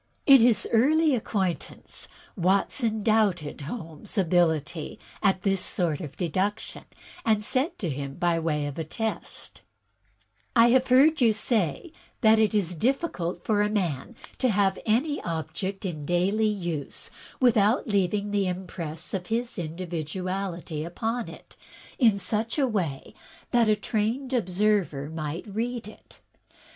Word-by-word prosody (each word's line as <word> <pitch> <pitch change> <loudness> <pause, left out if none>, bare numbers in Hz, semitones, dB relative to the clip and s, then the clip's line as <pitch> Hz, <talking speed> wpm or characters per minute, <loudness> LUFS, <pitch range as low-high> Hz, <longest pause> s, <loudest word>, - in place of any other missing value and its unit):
In 270 -3 +8
his 235 -1 +4
early 300 +6 +4
acquaintance 195 -7 -2 0.3
Watson 210 +4 +1
doubted 200 -10 +1
Holmes' 165 +1 -6
ability 165 -4 +1 0.2
at 195 -2 +2
this 195 -2 +2
sort 165 -4 +1
of 150 -4 -8
deduction, 185 +4 -2 0.4
and 215 -2 +2
said 260 - +1
to 190 - -3
him, 140 -2 -4
by 175 -1 +1
way 150 -3 -1
of 150 +2 -5
test: 220 +3 -4 0.9
"I 235 0 +7
have 260 +1 +4
heard 280 +4 +5
you 230 -3 +5
say 215 - -1 0.3
that 220 -2 +6
it 220 0 +2
is 185 -4 +1
difficult 180 - -1
for 210 -2 +2
a 210 - +2
man 185 - -2 0.2
to 255 - +2
have 195 -2 +2
any 275 +7 +1
object 185 +4 -4
in 155 -5 -4
daily 185 +7 +1
use 175 -8 -3 0.3
without 230 +1 +3
leaving 205 0 0
the 200 -2 +1
impress 175 -3 -5
of 180 -2 -3
his 230 -1 -2
individuality 175 0 -4
upon 225 +8 -3
it - - -13 0.4
in 225 -6 +5
such 220 +5 -2
a 280 - +3
way 180 - -2 0.4
that 235 -2 +4
a 215 - +5
trained 225 +6 -2
observer 185 - 0
might 160 +1 -4
read 225 +2 -3
it. 215 - -15
200 Hz, 135 wpm, -26 LUFS, 170-225 Hz, 0.9 s, In